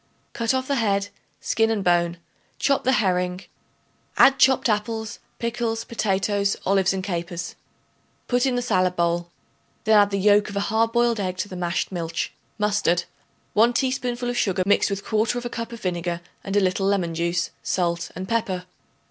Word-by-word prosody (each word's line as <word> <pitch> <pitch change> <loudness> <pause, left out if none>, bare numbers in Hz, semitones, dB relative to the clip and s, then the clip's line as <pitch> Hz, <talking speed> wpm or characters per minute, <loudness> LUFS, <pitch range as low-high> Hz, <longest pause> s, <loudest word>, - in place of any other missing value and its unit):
Cut 230 +2 0
off 260 0 -1
the 280 - 0
head, 200 -3 +1 0.3
skin 225 0 +1
and 215 -3 0
bone; 175 -1 +2 0.4
chop 275 -1 +1
the 260 - +4
herring; 180 -4 +1 0.8
add 270 0 +6
chopped 265 -1 +4
apples, 220 +1 -2 0.2
pickles, 230 -1 -2
potatoes, 200 -2 0
olives 195 -1 +3
and 190 -1 -3
capers. 175 -2 -4 0.7
Put 245 +1 +2
in 255 - +1
the 245 - 0
salad 185 -6 +1
bowl; 170 0 0 0.5
then 215 -1 +5
add 205 0 +4
the 200 - -1
yolk 205 +1 +4
of 205 - -8
a - - +1
hard 225 +1 +2
boiled 235 -1 +2
egg 185 -2 -2
to 205 - -2
the 185 - -7
mashed 175 +1 -2
milch, 165 -2 -3 0.2
mustard, 210 -5 +1 0.5
1 230 +3 +4
teaspoonful 250 -1 -1
of 245 - -4
sugar 190 -2 +1
mixed 205 - +3
with 200 0 -4
1/4 235 +3 0
cup 230 0 -5
of 235 - -9
vinegar 175 -1 -2 0.2
and 195 - -4
a - - +6
little 190 0 +1
lemon 185 -4 +1
juice, 170 +1 -1
salt 170 -2 -1
and 185 +2 -5
pepper. 190 -5 -1
200 Hz, 175 wpm, -24 LUFS, 180-230 Hz, 0.8 s, add